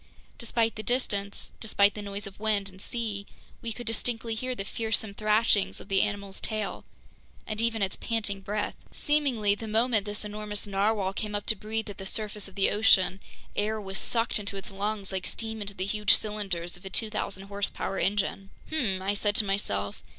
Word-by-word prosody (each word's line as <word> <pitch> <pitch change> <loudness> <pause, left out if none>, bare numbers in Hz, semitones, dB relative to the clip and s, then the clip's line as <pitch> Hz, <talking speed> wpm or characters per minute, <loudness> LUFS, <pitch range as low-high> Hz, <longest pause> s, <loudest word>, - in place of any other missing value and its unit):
Despite 230 -1 +1
the - - -2
distance, 205 -5 -1
despite 205 -2 +4
the 210 - -5
noise 200 0 -4
of 200 0 -10
wind 210 -2 +2
and 190 0 -13
sea, 210 -4 -3 0.3
we 230 - -3
could 240 +2 -6
distinctly 225 +1 -1
hear 255 +3 -2
the 195 - -3
fearsome 220 -1 -1
thrashings 215 -1 +3
of - - -12
the 195 -1 +5
animal's 200 -2 -1
tail, 215 -2 -2 0.6
and 215 0 -1
even 230 -2 +2
its 190 - 0
panting 210 -4 -1
breath. 205 +1 -1 0.2
Seemingly, 265 -9 +3
the 220 +2 -5
moment 220 -1 +3
this 210 +1 0
enormous 210 0 -3
narwhale 200 -1 +1
came 210 +1 -3
up 205 - -2
to 220 - +4
breathe 220 +2 -2
at 205 - -7
the 195 - -4
surface 210 -1 -1
of 195 - -12
the 195 - +4
ocean, 195 -3 +5 0.4
air 215 +1 +1
was 195 -2 -3
sucked 230 -1 +1
into 200 -1 -4
its 195 - -5
lungs 200 0 -2
like 190 -1 -2
steam 220 -1 -3
into 200 -1 -3
the 185 - -1
huge 210 +1 +5
cylinders 195 -5 -3
of 175 - -14
a 195 - -5
2,000 210 -2 -1
horsepower 200 -1 -2
engine. 195 -1 0 0.2
"Hmm!" 205 -12 +1
I 200 +1 +2
said 205 0 +1
to 210 - +4
myself. 100 - -1
205 Hz, 190 wpm, -29 LUFS, 195-220 Hz, 0.6 s, the